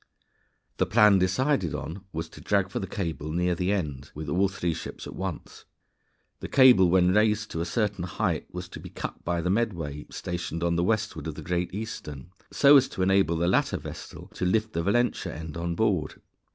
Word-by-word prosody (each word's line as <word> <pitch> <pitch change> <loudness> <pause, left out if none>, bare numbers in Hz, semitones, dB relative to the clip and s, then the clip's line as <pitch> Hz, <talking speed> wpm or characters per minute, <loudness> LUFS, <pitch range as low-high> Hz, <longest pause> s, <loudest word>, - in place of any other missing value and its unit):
The - - +1
plan 105 -3 +6
decided 95 - +1
on 95 +5 -6
was 80 +1 -4
to - - -13
drag 100 -2 +1
for - - -2
the 95 - -4
cable 80 -6 -4
near 90 +2 +1
the 90 +3 -1
end 75 -9 -3
with 75 -1 -5
all 95 +6 +2
three 90 -3 -2
ships - - -7
at - - -8
once. - - -6 0.7
The - - -6
cable 125 -9 +6
when 90 0 +4
raised 105 +1 +2
to 80 - -3
a - - -1
certain 100 -2 -1
height, 90 - -2
was 90 0 -6
to - - -9
be - - -9
cut - - -7
by 85 0 -1
the 90 +2 0
Medway 85 -10 -2
stationed 85 -2 -4
to 85 0 +1
the 85 0 +1
westward 110 -3 -1
of 80 - -5
the - - -8
Great 90 0 -1
Eastern, 90 -8 -7 0.2
so 145 0 +7
as 135 - +3
to 95 - -2
enable 95 -3 +3
the 85 +1 +1
latter 90 - +2
vessel - - -9
to - - -5
lift 110 +4 +1
the 85 - 0
Valentia 120 +7 0
end 80 -1 -7
on 85 0 -2
board. 90 -7 0
90 Hz, 205 wpm, -27 LUFS, 85-105 Hz, 0.7 s, so